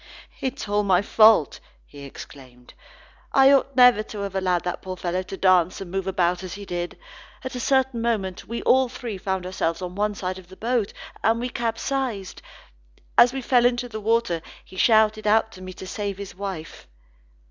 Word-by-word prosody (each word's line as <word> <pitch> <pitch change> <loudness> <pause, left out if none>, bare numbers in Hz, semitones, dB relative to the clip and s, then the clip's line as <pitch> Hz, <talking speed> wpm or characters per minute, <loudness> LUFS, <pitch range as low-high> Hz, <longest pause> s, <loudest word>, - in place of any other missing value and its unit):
"It 265 +1 -3
is - - -5
all 205 +1 +1
my 190 -2 +2
fault," 215 -7 +5 0.3
he 140 -1 -12
exclaimed. 130 -3 -13 0.6
"I 270 0 +6
ought 275 -1 +2
never 250 -4 +6
to 215 -1 -7
have 200 -1 -4
allowed 185 -2 0
that 180 0 -4
poor 185 -1 -6
fellow 180 +1 -2
to 190 +1 -8
dance 185 -2 +3
and 185 -3 -8
move 195 0 -3
about 180 -1 +1
as 185 0 -7
he 200 0 -9
did. 175 -1 -4 0.5
At 260 - -5
a 250 - -4
certain 265 -1 +1
moment 205 -6 -2
we 235 +1 -5
all 260 0 +4
three 235 -5 -6
found 190 -1 -2
ourselves 170 -3 -2
on 180 -1 -6
one 205 +2 -1
side 185 -1 -4
of 180 - -16
the 190 - -14
boat, 230 -2 -1 0.3
and 225 +2 +2
we 245 +1 -3
capsized. 235 -3 -3 0.7
As 240 - +7
we 265 0 -5
fell 245 -1 +3
into 245 0 +1
the 220 -2 -7
water, 220 -6 +1 0.2
he - - -15
shouted 215 +1 +3
out 220 +1 +3
to 185 - -13
me 185 0 -7
to 190 - -10
save 200 0 -4
his 200 -1 -8
wife." 185 -4 -7
200 Hz, 195 wpm, -24 LUFS, 185-235 Hz, 0.7 s, As